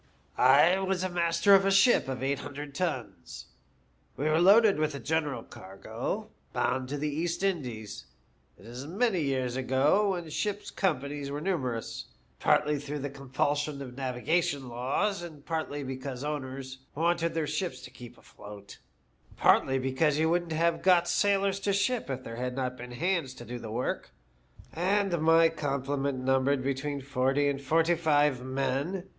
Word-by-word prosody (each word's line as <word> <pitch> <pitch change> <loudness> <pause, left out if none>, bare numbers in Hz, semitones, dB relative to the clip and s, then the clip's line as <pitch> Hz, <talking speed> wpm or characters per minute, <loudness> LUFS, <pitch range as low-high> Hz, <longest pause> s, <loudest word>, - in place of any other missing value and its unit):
" - - -36
I 150 +8 +5
was 190 -1 -1
master 170 +2 +3
of 195 0 +7
a 195 - +2
ship 195 - +5
of 130 -1 -4
eight 140 +1 0
hundred 145 0 -7
tons. 130 - -4 0.7
We 145 - -2
were 155 +2 +3
loaded 200 0 +6
with 155 -1 0
a - - -5
general 145 -3 -1
cargo, 95 +1 -6 0.2
bound 130 0 -1
to 145 - -3
the 150 +2 -2
East 165 +5 -2
Indies. 125 - -3 0.5
It - - -17
is 125 +4 -8
many 195 +1 +1
years 130 -3 -1
ago, 140 +10 +2
when 175 -2 -5
ship's 205 +5 -3
companies 145 -5 -2
were 145 +1 -4
numerous, 135 -10 -3 0.3
partly 150 -1 +2
through 145 +1 -5
the 145 -1 -4
compulsion 140 +2 -2
of 135 -2 -7
the 135 - -8
navigation 140 +2 -1
laws, 140 - -1 0.2
partly 155 -3 -3
because 130 0 -5
owners 135 -3 -5 0.2
wanted 170 +1 0
their 160 -2 0
ships 180 +4 -3
to - - -11
keep 120 -1 -12
afloat, 100 -1 -12 0.6
partly 135 0 +4
because 135 +3 +1
you 160 +1 +2
wouldn't 175 -1 0
have 165 +1 +1
got 180 -2 +4
sailors 200 -1 +2
to 200 0 0
ship 215 - 0
if 130 -1 -4
there 115 -1 -7
had 125 0 -3
not 130 -1 -2
been 125 0 -9
hands 165 -2 -1
to 120 - -10
do 120 0 -6
the 115 - -7
work; 120 +4 -3 0.6
and 185 0 +1
my 165 +1 +6
complement 140 -3 -2
numbered 135 +1 +1
between 140 +1 -2
forty 135 +1 +1
and 140 -1 -1
forty 165 +5 +2
five 150 -5 +2
men. 135 +8 -2
145 Hz, 160 wpm, -29 LUFS, 130-170 Hz, 0.7 s, of